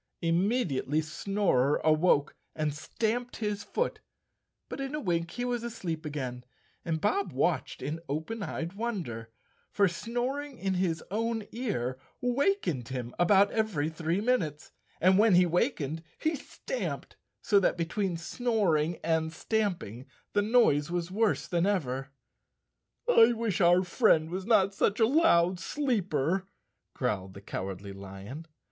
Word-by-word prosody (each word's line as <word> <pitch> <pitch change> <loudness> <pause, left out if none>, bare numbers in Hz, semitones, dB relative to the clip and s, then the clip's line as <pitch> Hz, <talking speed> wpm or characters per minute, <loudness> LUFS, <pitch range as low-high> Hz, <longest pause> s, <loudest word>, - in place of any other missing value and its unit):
Immediately 165 - +1
Snorer 160 -5 +1
awoke 155 -2 +3 0.2
and 155 -2 -1
stamped 225 +10 -2
his 210 -2 -2
foot, 480 - -2 0.7
but - - -6
in 270 +2 -3
a - - -2
wink 170 - -1
he 245 +7 -4
was 245 -1 -1
asleep 175 -9 -4
again 130 -4 -4 0.4
and 160 -1 -1
Bob 395 - 0
watched - - -1
in 155 +3 -3
open 160 +10 -3
eyed 170 -3 -4
wonder, 180 - -4 0.4
for 200 -1 +3
snoring 250 - -3
in 195 -2 -1
his 180 -3 0
own 225 +1 -1
ear 145 - -2 0.2
wakened 245 - 0
him 125 -2 -5
about 195 +3 +5
every 200 -10 0
three 165 +2 -1
minutes, 180 - -1 0.3
and 185 +2 +5
when 215 -3 +6
he 180 0 +6
wakened 165 - 0 0.2
he 315 +1 0
stamped, - - -5 0.2
so 205 -3 +4
that 185 - +1
between 175 +2 -1
snor¬ 205 -3 +1
ing 165 +3 -2
and 160 -1 +1
stamping 170 - -2 0.3
the 205 - +3
noise 205 -10 +3
was 175 0 -2
worse 220 +2 +1
than 175 +1 +1
ever. 135 -9 -1 1.0
'I 240 - +6
wish 225 -5 -1
our 175 +1 +5
friend 180 -5 +3
was 185 +2 -4
not 200 -4 +4
such 200 +2 +1
a 225 - +6
loud 185 - +4
sleeper," 190 - 0 0.5
growled 95 -2 -2
the 100 - -9
Cowardly 100 0 -5
Lion. 100 +11 -9
180 Hz, 140 wpm, -29 LUFS, 155-225 Hz, 1.0 s, when